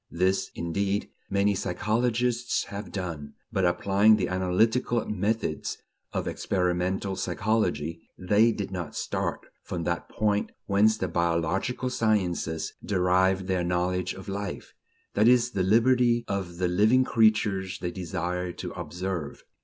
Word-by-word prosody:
This, 95 Hz, +3 st, +1 dB
indeed, 100 Hz, +4 st, -1 dB, 0.2 s
many 100 Hz, +1 st, +2 dB
psychologists 115 Hz, +6 st, 0 dB
have 100 Hz, -1 st, -6 dB
done; 85 Hz, -7 st, -5 dB, 0.2 s
but, 95 Hz, -, +2 dB
applying 100 Hz, +4 st, +4 dB
the 100 Hz, -4 st, -1 dB
analytical 110 Hz, +6 st, +1 dB
methods 105 Hz, +2 st, -1 dB, 0.3 s
of -, -, -2 dB
experimental 90 Hz, +1 st, -1 dB
psychology, 85 Hz, -5 st, -1 dB, 0.2 s
they 105 Hz, +5 st, +4 dB
did 100 Hz, -3 st, -4 dB
not 90 Hz, -5 st, -5 dB
start -, -, -2 dB, 0.2 s
from 85 Hz, -2 st, -4 dB
that 85 Hz, 0 st, -2 dB
point 105 Hz, -1 st, 0 dB
whence 105 Hz, +2 st, +3 dB
the 95 Hz, -, -1 dB
biological 85 Hz, +9 st, 0 dB
sciences 90 Hz, -8 st, 0 dB
derive 95 Hz, 0 st, +2 dB
their 95 Hz, -2 st, 0 dB
knowledge 90 Hz, +1 st, 0 dB
of 95 Hz, -, -10 dB
life: 100 Hz, -9 st, -5 dB, 0.4 s
that 105 Hz, +2 st, +4 dB
is, 120 Hz, 0 st, +4 dB
the 100 Hz, -, -1 dB
liberty 120 Hz, +4 st, +3 dB
of 95 Hz, -3 st, -3 dB
the 90 Hz, 0 st, +1 dB
living 105 Hz, +8 st, +4 dB
creatures 105 Hz, -5 st, +2 dB
they 90 Hz, -, -3 dB
desire 90 Hz, 0 st, -3 dB
to 90 Hz, 0 st, -6 dB
observe. 85 Hz, -1 st, -5 dB
95 Hz, 130 wpm, -27 LUFS, 90-110 Hz, 0.4 s, applying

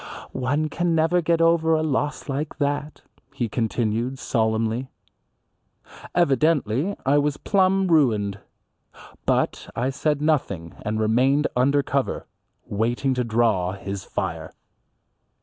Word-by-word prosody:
"One 145 Hz, +4 st, 0 dB
can 170 Hz, +2 st, 0 dB
never 165 Hz, +2 st, +3 dB
get 165 Hz, 0 st, +1 dB
over 165 Hz, -1 st, +4 dB
a 155 Hz, -, 0 dB
loss 145 Hz, 0 st, -1 dB
like 145 Hz, +2 st, -3 dB
that," 145 Hz, +1 st, -2 dB, 0.3 s
he 120 Hz, -, -1 dB
continued 115 Hz, +2 st, -1 dB
solemnly. 115 Hz, +1 st, 0 dB, 1.3 s
Evidently 155 Hz, -, +2 dB
I 140 Hz, +2 st, +4 dB
was 145 Hz, 0 st, 0 dB
plumb 195 Hz, +1 st, +2 dB
ruined. 110 Hz, -, +2 dB, 0.9 s
But -, -, 0 dB
I 125 Hz, +3 st, 0 dB
said 150 Hz, +2 st, 0 dB
nothing 130 Hz, -, -1 dB
and 110 Hz, +1 st, -2 dB
remained 130 Hz, +7 st, +3 dB
under 140 Hz, +3 st, +3 dB
cover, 135 Hz, -1 st, -1 dB, 0.4 s
waiting 120 Hz, +6 st, 0 dB
to 125 Hz, -1 st, 0 dB
draw 110 Hz, -6 st, +1 dB
his 95 Hz, 0 st, -6 dB
fire. -, -, -4 dB
135 Hz, 115 wpm, -24 LUFS, 115-155 Hz, 1.3 s, over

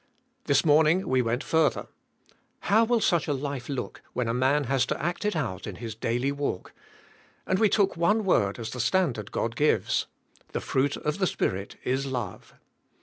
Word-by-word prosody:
This 140 Hz, +2 st, +3 dB
morning 160 Hz, +4 st, +4 dB
we 130 Hz, -1 st, +3 dB
went 120 Hz, +3 st, -1 dB
further. 160 Hz, -1 st, +1 dB, 0.8 s
How 220 Hz, +3 st, +4 dB
will 230 Hz, 0 st, +2 dB
such 170 Hz, -5 st, +2 dB
a 145 Hz, -, +1 dB
life 140 Hz, -2 st, -5 dB
look 135 Hz, -3 st, -4 dB
when 125 Hz, -2 st, -1 dB
a 115 Hz, -, 0 dB
man 135 Hz, +4 st, +2 dB
has 135 Hz, -1 st, +1 dB
to -, -, -2 dB
act 175 Hz, +6 st, -2 dB
it 210 Hz, -, 0 dB
out 115 Hz, -, -3 dB
in 100 Hz, -, -6 dB
his 115 Hz, 0 st, -6 dB
daily 120 Hz, +5 st, -1 dB
walk, 140 Hz, -9 st, -4 dB, 0.7 s
and 185 Hz, -, +1 dB
we 220 Hz, -, +4 dB
took 200 Hz, -1 st, +2 dB
one 205 Hz, +6 st, +2 dB
word 100 Hz, -, +2 dB
as 115 Hz, -2 st, -5 dB
the 125 Hz, -, -6 dB
standard 125 Hz, -, 0 dB
God 115 Hz, 0 st, -2 dB
gives: 150 Hz, +3 st, +1 dB, 0.5 s
"The -, -, -1 dB
fruit 135 Hz, +2 st, 0 dB
of 150 Hz, +4 st, -3 dB
the 190 Hz, -, +2 dB
Spirit 95 Hz, -, -2 dB
is 135 Hz, +2 st, -1 dB
love." 120 Hz, -8 st, -5 dB
140 Hz, 185 wpm, -27 LUFS, 120-170 Hz, 0.8 s, morning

